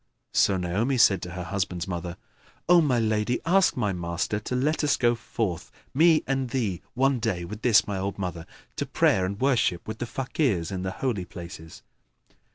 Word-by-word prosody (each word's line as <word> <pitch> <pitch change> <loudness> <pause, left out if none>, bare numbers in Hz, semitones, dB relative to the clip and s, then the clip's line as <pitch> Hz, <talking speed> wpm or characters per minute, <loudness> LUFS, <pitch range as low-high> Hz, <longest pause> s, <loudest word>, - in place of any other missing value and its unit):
So 95 - +3
Naomi 100 +9 0
said 100 -6 +5
to 90 - -6
her 90 0 -5
husband's 95 -2 -3
mother, 85 -1 -5 0.5
"O 175 0 +7
my 135 -6 +2
lady, 110 +1 0
ask 185 -1 +3
my 105 -5 0
master 85 +4 -2
to 115 +4 -4
let 150 +5 0
us 145 - +2
go 120 -1 +3
forth, 110 -5 -4 0.2
me 160 +2 +5
and 135 -2 -1
thee, 110 -9 -2
one 135 0 +2
day 100 -7 -2
with 105 +4 -8
this 115 -3 +5
my 100 -2 -3
old 100 +1 -3
mother, 90 -4 -5 0.3
to - - -2
prayer 95 -1 +2
and 100 +2 -5
worship 125 -10 +1
with 110 0 -6
the 120 - -3
Fakirs 115 - -1
in 95 -1 -3
the 95 - -2
Holy 105 -2 -2
Places." 85 -2 -10
105 Hz, 185 wpm, -26 LUFS, 90-125 Hz, 0.5 s, O